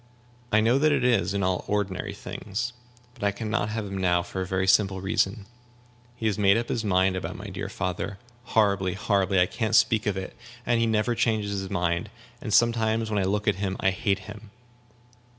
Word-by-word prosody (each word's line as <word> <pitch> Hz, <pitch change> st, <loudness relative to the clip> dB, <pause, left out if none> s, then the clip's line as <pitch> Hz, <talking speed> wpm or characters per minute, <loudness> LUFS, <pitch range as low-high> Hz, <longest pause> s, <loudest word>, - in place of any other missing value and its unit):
"I 110 Hz, -, +4 dB
know 120 Hz, +5 st, +3 dB
that 155 Hz, +1 st, +4 dB
it 140 Hz, -3 st, +1 dB
is, 100 Hz, -7 st, +2 dB
in 100 Hz, -, 0 dB
all 90 Hz, -1 st, 0 dB
ordinary 100 Hz, -3 st, -2 dB
things. 105 Hz, +5 st, -5 dB, 0.4 s
But 120 Hz, -, -11 dB
I 100 Hz, -, +3 dB
can 105 Hz, +2 st, -5 dB
not 110 Hz, -2 st, 0 dB
have 110 Hz, 0 st, -3 dB
him 95 Hz, -1 st, -5 dB
now, 90 Hz, -2 st, +2 dB
for 95 Hz, 0 st, -5 dB
a 95 Hz, -, -3 dB
very 95 Hz, 0 st, 0 dB
simple 95 Hz, 0 st, +3 dB
reason. 95 Hz, +1 st, 0 dB, 0.7 s
He 115 Hz, -, -6 dB
has 105 Hz, -2 st, 0 dB
made 100 Hz, +1 st, +5 dB
up 115 Hz, 0 st, -2 dB
his 115 Hz, -, -1 dB
mind 95 Hz, -2 st, +2 dB
about 95 Hz, -, -4 dB
my -, -, -8 dB
dear -, -, -5 dB
father 95 Hz, +2 st, -3 dB, 0.3 s
horribly, 100 Hz, -5 st, +2 dB
horribly; 95 Hz, -2 st, +1 dB
I 90 Hz, -, +5 dB
can't 110 Hz, +3 st, -1 dB
speak 110 Hz, -1 st, +3 dB
of 100 Hz, -2 st, 0 dB
it. 95 Hz, -, -6 dB, 0.3 s
And 120 Hz, -1 st, +2 dB
he 115 Hz, -, +2 dB
never 110 Hz, +2 st, +1 dB
changes 110 Hz, -3 st, 0 dB
his 95 Hz, -1 st, -5 dB
mind; 85 Hz, 0 st, -1 dB, 0.3 s
and 110 Hz, -, -5 dB
sometimes 115 Hz, -1 st, +2 dB
when 105 Hz, -, +1 dB
I 95 Hz, -, +1 dB
look 105 Hz, +2 st, -1 dB
at 100 Hz, -2 st, +2 dB
him 95 Hz, -1 st, -2 dB
I 95 Hz, -, +2 dB
hate 100 Hz, +1 st, 0 dB
him." 105 Hz, 0 st, -10 dB
100 Hz, 210 wpm, -26 LUFS, 95-110 Hz, 0.7 s, made